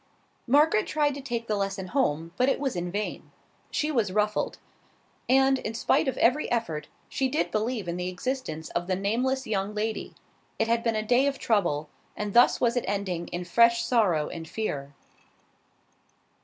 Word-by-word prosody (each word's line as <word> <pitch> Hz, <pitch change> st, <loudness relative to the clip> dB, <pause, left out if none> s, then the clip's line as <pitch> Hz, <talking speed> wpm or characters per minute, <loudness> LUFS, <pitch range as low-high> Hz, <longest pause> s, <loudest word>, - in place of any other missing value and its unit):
Margaret 310 Hz, -, +4 dB
tried 295 Hz, -2 st, +1 dB
to 280 Hz, -, -7 dB
take 240 Hz, -3 st, -3 dB
the 215 Hz, -, -1 dB
lesson 195 Hz, -2 st, -3 dB
home, 165 Hz, -, 0 dB
but 255 Hz, +6 st, +3 dB
it -, -, +1 dB
was 270 Hz, -6 st, -1 dB
in 175 Hz, 0 st, -2 dB
vain. 205 Hz, +2 st, -4 dB, 0.4 s
She 305 Hz, +1 st, -1 dB
was 225 Hz, -9 st, +1 dB
ruffled; 210 Hz, +1 st, 0 dB, 0.7 s
and, 265 Hz, +1 st, +4 dB
in 220 Hz, -2 st, -5 dB
spite 235 Hz, -, +2 dB
of 265 Hz, -, -1 dB
every 255 Hz, +6 st, +2 dB
effort, 165 Hz, -11 st, -1 dB, 0.2 s
she 265 Hz, -1 st, -1 dB
did 300 Hz, -, -1 dB
believe 220 Hz, -2 st, -1 dB
in 170 Hz, +1 st, -2 dB
the 180 Hz, 0 st, -2 dB
existence 180 Hz, -, -4 dB
of 175 Hz, 0 st, -2 dB
the 185 Hz, -, +1 dB
nameless 250 Hz, +7 st, 0 dB
young 205 Hz, -1 st, -2 dB
lady. 215 Hz, +1 st, -3 dB, 0.4 s
It 225 Hz, -, +1 dB
had 230 Hz, 0 st, +2 dB
been 230 Hz, -1 st, 0 dB
a 215 Hz, -, 0 dB
day 250 Hz, +5 st, +3 dB
of 280 Hz, -, -1 dB
trouble; 170 Hz, -9 st, +1 dB, 0.3 s
and 210 Hz, -1 st, -3 dB
thus 240 Hz, +1 st, +5 dB
was 235 Hz, 0 st, +2 dB
it 245 Hz, -, 0 dB
ending 190 Hz, -4 st, -2 dB
in 175 Hz, +1 st, -5 dB
fresh 235 Hz, +5 st, +4 dB
sorrow 185 Hz, -11 st, +2 dB
and 165 Hz, -1 st, -7 dB
fear. 145 Hz, -9 st, -4 dB
220 Hz, 180 wpm, -27 LUFS, 185-255 Hz, 0.7 s, thus